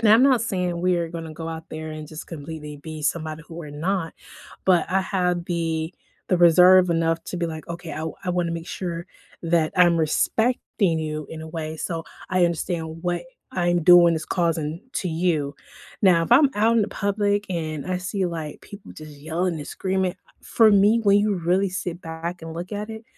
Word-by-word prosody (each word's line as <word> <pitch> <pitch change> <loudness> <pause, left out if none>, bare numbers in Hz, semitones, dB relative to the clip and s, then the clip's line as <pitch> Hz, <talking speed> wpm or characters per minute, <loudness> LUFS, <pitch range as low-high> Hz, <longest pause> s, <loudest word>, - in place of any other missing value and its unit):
And 225 - +3
I'm 220 +4 +7
not 260 -5 +4
saying 180 -5 -1
we 180 0 +2
are 170 -1 -1
gonna 165 -1 -7
go 165 +1 -6
out 160 0 -7
there 155 0 -6
and 155 -1 -8
just 155 0 -8
completely 150 -2 -8
be 155 0 -8
somebody 155 +1 -2
who 165 - -11
we're 160 -3 -7
not, 165 +3 -2 0.5
but 180 -3 +4
I 190 - +3
have 180 -3 0
the 165 -2 -2 0.3
the 180 - +3
reserve 180 +1 +7
enough 165 0 +1
to - - -5
be 170 -1 -1
like, 160 -1 -7
"Okay, 170 -2 -6
I 150 - -5
w 160 0 -4
I 180 - 0
wanna 175 -1 0
make 165 0 -5
sure 170 -1 -5 0.4
that 165 -2 +2
I'm 175 -2 +5
respecting 190 +2 +1
you, 155 -1 -4
in 160 -1 -7
a - - -7
way, 160 -1 -5
so 165 0 -3 0.3
I 185 -1 +3
understand 165 -1 -2
what 175 -1 -1 0.3
I'm 175 -2 +1
doing 175 0 +7
is 155 -1 -4
causing, 165 -2 -1
to 185 - -1
you." 160 -4 0 0.5
Now, 180 -4 +5
if - - -9
I'm 280 +2 +6
out 225 +3 +3
in 220 - +4
the 205 - -2
public, 205 0 0
and 155 -4 -3
I 185 0 -1
see, 185 0 -2
like, 160 -3 -5
people 200 0 -12
just 155 -2 -11
yelling 165 +4 -1
and 145 - -7
screaming, 190 -1 -1 0.3
for 225 -2 +4
me, 205 +3 +5
when 200 -1 +5
you 210 0 +2
really 180 +3 +1
sit 180 -1 -4
back 165 +2 -6
and 165 0 -7
look 175 +4 -6
at 210 +2 -4
it, 220 0 -8
170 Hz, 205 wpm, -24 LUFS, 160-185 Hz, 0.5 s, I'm